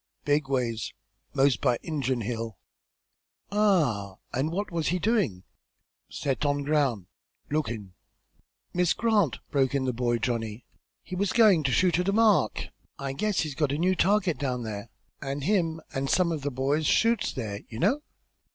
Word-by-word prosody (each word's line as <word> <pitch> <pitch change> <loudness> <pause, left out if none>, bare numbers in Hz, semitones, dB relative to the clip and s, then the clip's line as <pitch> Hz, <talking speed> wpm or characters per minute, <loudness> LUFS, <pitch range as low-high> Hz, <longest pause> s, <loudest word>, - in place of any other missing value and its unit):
"Big 145 -1 +1
ways. 120 -4 -1 0.4
Most 135 -1 +3
by 125 -4 +2
Injun 135 -6 -1
Hill." 115 -2 -4 0.9
"Ah! 155 - +2 0.2
and 135 +6 0
what 200 +3 -3
was 165 -2 -1
he 180 - +1
doing?" 180 - 0 0.7
"Set 135 +1 -2
on 145 -1 +1
ground 140 - +1 0.5
lookin'." 115 -11 -2 0.8
"Miss 180 -1 +3
Grant!" 210 - +2
broke 135 -1 +2
in 135 -1 +1
the 130 - 0
boy 120 0 +1
Johnny. 115 -2 -3 0.4
"He 185 - -6
was 195 +1 0
goin' 215 -8 +5
to 135 - +2
shoot 180 +6 +3
at 180 +2 +1
a - - +1
mark; 215 - +3 0.3
I 135 -1 -4
guess 210 +7 0
he's 155 -3 -3
got 150 -1 0
a 145 - 0
new 185 +3 +2
target 185 -5 +2
down 125 -3 -2
there, 110 0 -6 0.3
an' 140 +1 -3
him 165 -1 +1
an' 135 0 -1
some 175 +3 +2
of 155 -3 -2
the 145 - -1
boys 140 +4 0
shoots 230 -2 +3
there, 105 -5 -4
you 110 - -7
know. 225 - +2
145 Hz, 165 wpm, -27 LUFS, 125-180 Hz, 0.9 s, goin